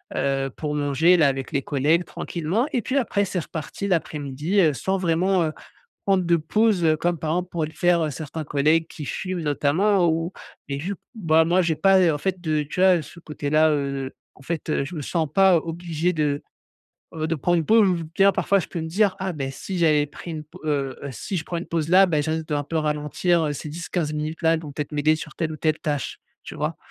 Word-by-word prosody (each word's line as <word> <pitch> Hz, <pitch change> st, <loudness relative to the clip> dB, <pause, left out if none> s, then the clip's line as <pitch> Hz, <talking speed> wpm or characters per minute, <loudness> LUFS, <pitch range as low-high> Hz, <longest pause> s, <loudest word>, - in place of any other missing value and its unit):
heu, 135 Hz, 0 st, 0 dB
pour 150 Hz, -1 st, -3 dB
manger, 145 Hz, +5 st, +3 dB
là, 155 Hz, -4 st, +5 dB
avec 135 Hz, -1 st, -2 dB
les 140 Hz, -, 0 dB
collègues 150 Hz, +5 st, +1 dB
tranquillement 180 Hz, -, -2 dB
et 245 Hz, -, +1 dB
puis 270 Hz, -, -1 dB
après 205 Hz, -6 st, +1 dB
c'est 180 Hz, -1 st, -2 dB
reparti 165 Hz, +5 st, -5 dB
l'après-midi, 155 Hz, +1 st, -1 dB
heu, 155 Hz, -4 st, +4 dB
sans 190 Hz, +7 st, -1 dB
vraiment, 180 Hz, +1 st, +2 dB
heu, 155 Hz, -, -3 dB, 0.5 s
prendre 190 Hz, -2 st, +3 dB
de 170 Hz, 0 st, +3 dB
pause, 190 Hz, +3 st, +1 dB
heu, 155 Hz, -1 st, +4 dB
comme, 175 Hz, 0 st, -1 dB
par 155 Hz, +1 st, -3 dB
exemple, 180 Hz, +1 st, -1 dB
pourraient 160 Hz, -3 st, -1 dB
le -, -, -13 dB
faire 170 Hz, -3 st, +2 dB
certains 155 Hz, +3 st, -6 dB
collègues 155 Hz, +3 st, +2 dB
qui 150 Hz, -, -8 dB
fument 185 Hz, +3 st, -4 dB
notamment 170 Hz, +6 st, +2 dB
ou 165 Hz, +3 st, -1 dB, 0.4 s
et 140 Hz, 0 st, -3 dB
vu 190 Hz, +7 st, -3 dB
que -, -, -21 dB
bah 160 Hz, -6 st, +3 dB
moi 175 Hz, +3 st, +3 dB
j'ai 165 Hz, -2 st, 0 dB
pas, 195 Hz, -1 st, +5 dB
heu, 170 Hz, -3 st, +4 dB
en -, -, -3 dB
fait 185 Hz, +2 st, -2 dB
de, 155 Hz, -3 st, 0 dB
tu 155 Hz, +5 st, -5 dB
vois? 185 Hz, -4 st, +5 dB
Ce 170 Hz, -, -13 dB
côté-là, 155 Hz, 0 st, +1 dB
heu, 140 Hz, -2 st, -2 dB, 0.2 s
en -, -, -18 dB
fait, 155 Hz, -2 st, -2 dB
je 170 Hz, +5 st, -7 dB
me 150 Hz, -, -4 dB
sens 160 Hz, +1 st, -1 dB
pas 190 Hz, -1 st, +5 dB
obligé 165 Hz, +1 st, -1 dB
de, 150 Hz, -3 st, 0 dB, 0.7 s
heu, 155 Hz, 0 st, -2 dB
de 165 Hz, -, 0 dB
prendre 175 Hz, +4 st, +1 dB
une 160 Hz, -, -1 dB
pause 220 Hz, 0 st, +5 dB
ou 170 Hz, -3 st, 0 dB
bien 195 Hz, 0 st, +5 dB
parfois 200 Hz, -, +2 dB
je -, -, -7 dB
peux 170 Hz, -, -4 dB
me 160 Hz, -, -4 dB
dire: 195 Hz, +3 st, +1 dB
«Ah 190 Hz, -1 st, -2 dB
beh, 135 Hz, -2 st, -3 dB
si 185 Hz, +7 st, -6 dB
j'avais 150 Hz, -3 st, +3 dB
pris 170 Hz, +4 st, -10 dB
une 155 Hz, -1 st, -5 dB
p 165 Hz, +4 st, -15 dB
heu, 140 Hz, -4 st, -1 dB, 0.2 s
si 185 Hz, -, -5 dB
je 160 Hz, -, -3 dB
prends 175 Hz, -, -4 dB
une 170 Hz, -, -6 dB
pause 165 Hz, -2 st, -2 dB
là, 190 Hz, +2 st, +6 dB
bah 155 Hz, -4 st, +1 dB
je 155 Hz, -, -2 dB
risque 160 Hz, 0 st, -2 dB
d'un 145 Hz, -1 st, 0 dB
peu 160 Hz, +3 st, -4 dB
ralentir, 155 Hz, +3 st, +1 dB
heu. 145 Hz, -, -1 dB
Ces 150 Hz, +2 st, -6 dB
10-15 160 Hz, 0 st, -3 dB
minutes-là, 160 Hz, +2 st, 0 dB
elles 160 Hz, -, -1 dB
vont 150 Hz, -3 st, -8 dB
peut-être 150 Hz, +1 st, -5 dB
m'aider 150 Hz, +1 st, +3 dB
sur 155 Hz, -1 st, -8 dB
telle 160 Hz, -2 st, -2 dB
ou -, -, -6 dB
telle 155 Hz, 0 st, 0 dB
tâche», 145 Hz, -3 st, -3 dB, 0.3 s
tu -, -, -8 dB
vois? -, -, -2 dB
160 Hz, 235 wpm, -23 LUFS, 150-180 Hz, 0.7 s, là